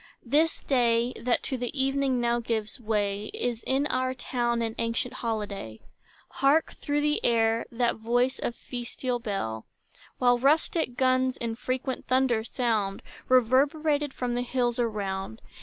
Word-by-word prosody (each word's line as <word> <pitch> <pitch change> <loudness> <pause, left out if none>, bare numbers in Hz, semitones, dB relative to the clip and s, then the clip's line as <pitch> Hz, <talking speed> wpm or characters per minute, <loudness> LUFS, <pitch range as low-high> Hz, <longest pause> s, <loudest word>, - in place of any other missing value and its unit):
This 300 +6 +2
day, 240 -2 +2
that 240 0 +1
to 265 - -2
the 250 +3 -4
evening 270 -1 +1
now 240 0 +1
gives 225 0 -3
way, 210 -2 -1
Is 240 -2 -2
in 270 +2 +2
our 255 -2 0
town 240 -2 -1
an 225 -1 -2
ancient 230 +2 -1
holiday. 205 - -4 0.6
Hark, 285 +4 +4
through 290 0 -1
the 295 0 +1
air, 225 -1 +2
that 235 0 +1
voice 245 +3 +1
of 235 - -2
festal 245 0 -4
bell, 195 - -3 0.5
While 245 -1 +4
rustic 300 - +2
guns 255 0 +2
in 230 -1 -3
frequent 255 +2 -3
thunders 255 -3 +2
sound, 215 -6 0 0.3
Reverberated 285 +4 +3
from 250 -2 -3
the 245 - 0
hills 245 -1 0
around. 195 - -2
245 Hz, 140 wpm, -27 LUFS, 230-260 Hz, 0.6 s, Hark